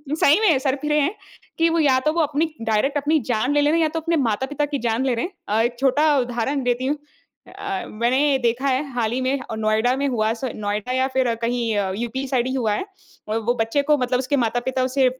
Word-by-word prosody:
सही 310 +3 +4
में 340 -11 +4
सरफ़िरे 285 +3 0
हैं 300 +8 0 0.4
कि 330 0 +3
वो 330 0 +1
या 275 -4 +4
तो 305 - +2
वो 335 - +1
अपनी 305 +2 0
डायरेक्ट 225 +6 +1
अपनी 300 +2 +2
जान 245 +4 +1
ले 290 - +3
ले 290 - +3
रहे 325 +2 +2
हैं - - +3
या 310 - +2
तो 325 - -1
अपने 335 +1 0
माता-पिता 265 +4 0
की 285 -1 -3
जान 235 +2 0
ले 260 - +1
रहे 230 - -1
हैं। 360 - -7 0.2
अ, 215 +2 +2
एक 240 +1 -1
छोटा 290 +3 +3
उदाहरण 250 +3 -1
देती 245 +1 0
हूँ। 290 +3 0 0.5
अ - - -14
अ, 390 -2 -4
मैंने 260 +6 +1
देखा 245 +3 0
है 265 +2 +1
हाल 230 -3 0
ही 250 - -1
में 265 +2 0 0.2
नोएडा 220 +3 +1
में 280 +1 0
हुआ 220 -4 0
स 230 - -11
नोएडा 210 +3 -3
या 260 +1 +1
फिर 255 -2 +2
कहीं 235 -1 0
अ, 195 -2 0
यूपी 240 +4 -3
साइड 255 -2 0
ही 260 - -2
हुआ 225 -5 0
है। 210 - -2 0.5
अ, 215 - -1
वो 225 +2 0
बच्चे 225 +6 +1
को 300 +1 +3
मतलब 250 -1 0
उसके 265 +3 0
माता-पिता 245 +2 0
उसे 260 +1 +2
260 Hz, 245 wpm, -22 LUFS, 235-290 Hz, 0.5 s, सही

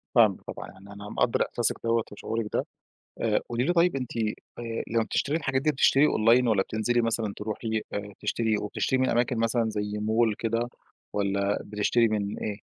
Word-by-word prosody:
فاهمِك 110 -5 +5
طبعًا، - - -7
يعني 100 +2 -14
أنا 105 +1 -9
مقدّر 125 -1 +1
إحساسِك 120 - 0
دوَّة 115 -1 +2
وشعورِك 110 +2 -3
ده، - - 0 0.6
آآ، - - +2
قُولي 120 +1 0
لي 175 - +2
طيب 175 -2 +3
أنتِ 125 -3 -5 0.4
آآ، 115 -1 -4
لمّا 115 0 +2
بتشتري 145 +6 0
الحاجات 135 -4 0
دي 155 - +3
بتشتري 140 +1 +5
Online 120 +3 +4
والَّا 100 -4 +3
بتنزلي 115 +4 0
مثلًا 115 -3 0
تروحي 110 +1 -3
آآ 100 0 -4
تشتري، 110 +1 0
وبتشتري 105 +5 -1
من 130 - +2
أماكن 120 +1 +1
مثلًا 115 0 +1
زي 105 0 -3
Mall 110 +1 +2
كده، 115 +1 -1 0.4
والَّا 100 0 0
بتشتري 105 +3 +2
مِن 105 -2 -2
إيه؟ 105 -2 -3
115 Hz, 180 wpm, -27 LUFS, 105-120 Hz, 0.6 s, فاهمِك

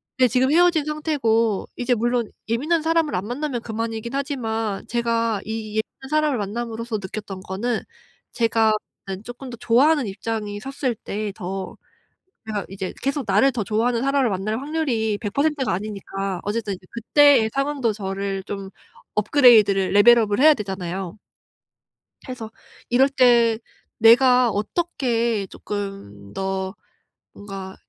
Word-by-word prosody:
네 255 0 +4
지금 255 +3 +2
헤어진 340 -1 +4
상태고 265 -9 0
이제 245 0 0
물론 240 0 0 0.2
예민한 300 +9 +1
사람을 325 -2 +1
안 185 +2 -2
만나면 255 0 -3
그만이기는 225 +2 -4
하지만 225 -7 -3
제가 230 -3 0
이 220 -1 -5
예민한 220 +4 -4
사람을 305 -3 +2
만남으로써 230 +2 -4
느꼈던 195 -1 -7
거는 215 +6 -2 0.5
제가 225 -2 +2 0.4
음 190 0 -4
쪼끔 245 +3 -9
더 235 - -8
좋아하는 270 +4 +3
입장이 205 +1 -4
섰을 265 +1 -3
때 210 0 -4
더 190 0 -6 0.7
제가 210 -3 -3
이제 190 -1 -5
계속 275 0 -1
나를 270 - +4
더 235 -5 -3
좋아하는 230 +3 0
사람을 275 -3 +2
만날 210 +4 -2
확률이 260 -8 -1
100% 280 +7 0
가 - - -1
아니니까 195 -1 -4
어쨌든 210 -1 -2
이 - - -8 0.2
그때의 240 0 +4
상황도 275 -4 0
저를 195 -1 -4
좀 195 -1 -6 0.5
업그레이드를 210 -4 +5
레벨 215 +4 +7
업을 205 -2 0
해야 310 +2 +7
되잖아요. 190 -4 -5 1.1
해서 230 -3 -6 0.4
이럴 260 +3 +4
때 240 -4 +4 0.4
내가 250 +2 +6
어떻게 235 - -1
쪼끔 195 - -7
더 190 0 -3 0.6
뭔가 195 -2 -8
225 Hz, 295 characters per minute, -22 LUFS, 205-260 Hz, 1.1 s, 레벨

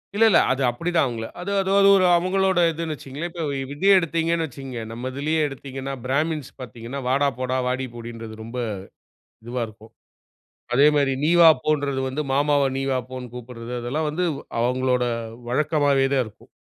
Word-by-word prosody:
இல்ல, 225 +2 +5
இல்ல. 205 - +6
அது 130 +1 0
அப்படித்தான் 165 +6 0
அவங்கள. 115 -2 -4 0.2
அது 190 +3 -4
அது 190 -1 0 0.3
ஒரு 185 - +3
அவங்களோட 190 +1 +1
இதுன்னு 165 0 -4
வச்சிக்கங்களேன். 145 +5 -6
இப்ப 165 -1 -5 0.3
இதே 195 +7 +3
எடுத்தீங்கனு 165 0 0
வச்சிக்கங்க, 135 -4 -7
நம்ம 120 +3 -5
இதுலேயே 155 +3 0
எடுத்தீங்கனா 135 0 -6
பிராமின்ஸ் 150 +2 -1
பார்த்தீங்கன்னா 120 +2 -7
"வாடா 140 +2 +3
போடா, 130 0 -1
வாடி 130 +1 -1
போடி" 120 0 -7
ன்றது 110 -1 -9
ரொம்ப 115 +3 -8 0.9
இதுவா 120 +2 -4
இருக்கும். 110 +1 -15 0.8
அதே 140 +3 +6
மாதிரி 140 -2 +2
"நீ 155 - +3
வா 165 - +10
போ" 155 - +3
ன்றது 140 -2 -2
வந்து, 140 +4 -2
மாமாவ 145 +1 +3 0.2
நீ - - -1
வா 130 - +1
போனு 125 -2 -7
கூப்பிடுறது. 120 -1 -8
அதெல்லாம் 145 +6 -2
வந்து 180 +4 -1 0.3
அவங்களோட 125 +1 +1 0.5
வழக்கமாகவேதான் 140 -2 +2
இருக்கும். 105 -1 -16
135 Hz, 160 wpm, -23 LUFS, 125-155 Hz, 0.9 s, வா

